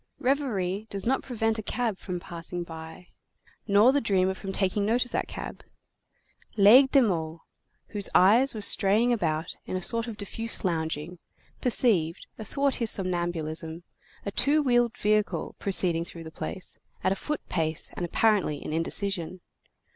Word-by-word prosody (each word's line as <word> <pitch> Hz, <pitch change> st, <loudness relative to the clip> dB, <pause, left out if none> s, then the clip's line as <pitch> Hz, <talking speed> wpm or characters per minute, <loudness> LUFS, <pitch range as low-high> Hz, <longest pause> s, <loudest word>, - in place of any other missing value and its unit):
Reverie 220 Hz, -7 st, -1 dB
does 195 Hz, -1 st, -5 dB
not 265 Hz, +3 st, +1 dB
prevent 225 Hz, -3 st, -2 dB
a -, -, -2 dB
cab 225 Hz, -2 st, -2 dB
from 180 Hz, -1 st, -5 dB
passing 175 Hz, 0 st, -5 dB
by, 160 Hz, +1 st, -11 dB, 0.6 s
nor 205 Hz, +4 st, +5 dB
the 285 Hz, +1 st, +1 dB
dreamer 190 Hz, -4 st, +1 dB
from 195 Hz, 0 st, -7 dB
taking 195 Hz, +1 st, 0 dB
note 235 Hz, +4 st, +1 dB
of 245 Hz, -, -15 dB
that -, -, -2 dB
cab. -, -, -8 dB, 0.9 s
Laigle 235 Hz, +7 st, +7 dB
de 275 Hz, -1 st, +5 dB
Meaux, 165 Hz, -5 st, -2 dB, 0.5 s
whose 205 Hz, -2 st, -2 dB
eyes 230 Hz, +8 st, +5 dB
were 215 Hz, -, -5 dB
straying 210 Hz, +4 st, +4 dB
about 160 Hz, -8 st, -2 dB
in -, -, -4 dB
a 185 Hz, -, -6 dB
sort 230 Hz, +3 st, 0 dB
of 225 Hz, -3 st, -7 dB
diffuse 225 Hz, +2 st, -3 dB
lounging, 160 Hz, 0 st, -3 dB, 0.4 s
perceived, 195 Hz, -9 st, +4 dB
athwart 275 Hz, +5 st, 0 dB
his 230 Hz, -, +2 dB
somnambulism, 170 Hz, -3 st, -1 dB, 0.4 s
a 200 Hz, -, -3 dB
two 295 Hz, +7 st, +2 dB
wheeled 240 Hz, -3 st, +2 dB
vehicle 210 Hz, 0 st, 0 dB
proceeding 180 Hz, -4 st, +2 dB
through 170 Hz, -1 st, -8 dB
the 160 Hz, -, -10 dB
place, 180 Hz, +3 st, -7 dB, 0.2 s
at 185 Hz, -, +2 dB
a -, -, +1 dB
foot 300 Hz, +7 st, -5 dB
pace 160 Hz, -2 st, -2 dB
and -, -, -5 dB
apparently 195 Hz, -3 st, +1 dB
in 155 Hz, -, -6 dB
indecision. 185 Hz, +1 st, -2 dB
195 Hz, 155 wpm, -27 LUFS, 175-230 Hz, 0.9 s, Laigle